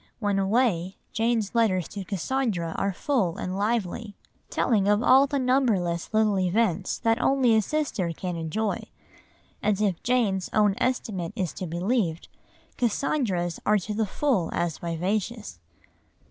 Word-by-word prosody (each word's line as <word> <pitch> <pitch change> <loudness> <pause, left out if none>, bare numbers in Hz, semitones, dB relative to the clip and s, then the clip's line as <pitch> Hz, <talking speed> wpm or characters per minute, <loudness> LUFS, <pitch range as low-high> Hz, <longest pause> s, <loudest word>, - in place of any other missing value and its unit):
When 205 -3 0
away, 195 -3 +1 0.2
Jane's 225 -2 0
letters 205 -7 +2
to 200 -1 -6
Cassandra 195 -3 -2
are 195 - 0
full 195 - 0
and 185 +1 -3
lively, 210 0 -2 0.3
telling 210 -5 +1
of 210 +2 +3
all 265 +3 +6
the 280 - -1
numberless 230 -11 +1
little 215 -2 +2
events 185 0 +1
that 225 -1 +1
only 260 -4 +3
a 220 - +4
sister 215 - -1
can 180 +2 -4
enjoy. 170 +7 -2 0.8
And 210 -1 +1
if 200 -5 0
Jane's 220 -7 +1
own 210 -2 +4
estimate 205 -8 -1
is 185 -7 -2
to 185 - -5
be 165 +1 -5
believed, 180 -4 -1 0.5
Cassandra's 215 - 0
are 210 - +3
to 210 +2 -4
the 215 0 0
full 235 - 0
as 170 -2 -1
vivacious. 190 - -3
205 Hz, 145 wpm, -26 LUFS, 180-235 Hz, 0.8 s, all